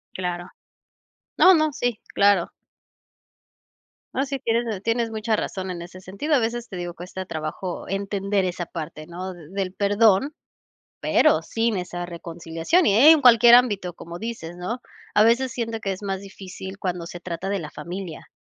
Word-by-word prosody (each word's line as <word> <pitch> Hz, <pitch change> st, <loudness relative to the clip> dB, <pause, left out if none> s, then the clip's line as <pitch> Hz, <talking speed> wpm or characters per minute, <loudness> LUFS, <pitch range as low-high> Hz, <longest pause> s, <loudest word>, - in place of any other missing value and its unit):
Claro. 180 Hz, -1 st, -3 dB, 0.9 s
No, 375 Hz, +1 st, +8 dB
no, 310 Hz, -2 st, +3 dB
sí, 245 Hz, -4 st, -1 dB
claro. 200 Hz, -3 st, +3 dB, 1.6 s
No, 270 Hz, -, +1 dB
sí, 275 Hz, -1 st, -4 dB
tienes 230 Hz, -4 st, -1 dB
tienes 230 Hz, +1 st, 0 dB
mucha 220 Hz, 0 st, 0 dB
razón 190 Hz, -2 st, -3 dB
en 170 Hz, -1 st, -6 dB
ese 180 Hz, +2 st, -10 dB
sentido, 200 Hz, -, -1 dB
a -, -, +4 dB
veces 235 Hz, +1 st, -2 dB
te 190 Hz, -, -6 dB
digo: 175 Hz, -1 st, -4 dB
"Cuesta 180 Hz, +2 st, -7 dB
trabajo 160 Hz, +2 st, -5 dB
entender 195 Hz, 0 st, -1 dB
esa 175 Hz, -1 st, -3 dB
parte, 155 Hz, -2 st, -7 dB
¿no?, 185 Hz, +2 st, -6 dB
del 185 Hz, +3 st, -5 dB
perdón, 205 Hz, +6 st, +3 dB, 0.7 s
pero -, -, +3 dB
sin 225 Hz, -2 st, -1 dB
esa 175 Hz, -1 st, -4 dB
reconciliación, 170 Hz, -, -1 dB
y -, -, +4 dB
en 305 Hz, +5 st, +8 dB
cualquier 240 Hz, -2 st, +8 dB
ámbito, 205 Hz, -8 st, +2 dB
como 170 Hz, +1 st, -9 dB
dices, 210 Hz, -7 st, -6 dB
¿no? 225 Hz, +8 st, -4 dB, 0.3 s
A 210 Hz, -, +7 dB
veces 240 Hz, +3 st, +3 dB
siento 230 Hz, -2 st, -3 dB
que 195 Hz, -2 st, -2 dB
es 190 Hz, -, -10 dB
más 195 Hz, -1 st, -2 dB
difícil 190 Hz, -1 st, -9 dB
cuando 180 Hz, -3 st, -3 dB
se 175 Hz, 0 st, -9 dB
trata 175 Hz, +1 st, -5 dB
de 200 Hz, 0 st, -1 dB
la 155 Hz, -3 st, -6 dB
familia, 175 Hz, 0 st, -7 dB
195 Hz, 165 wpm, -24 LUFS, 175-230 Hz, 1.6 s, No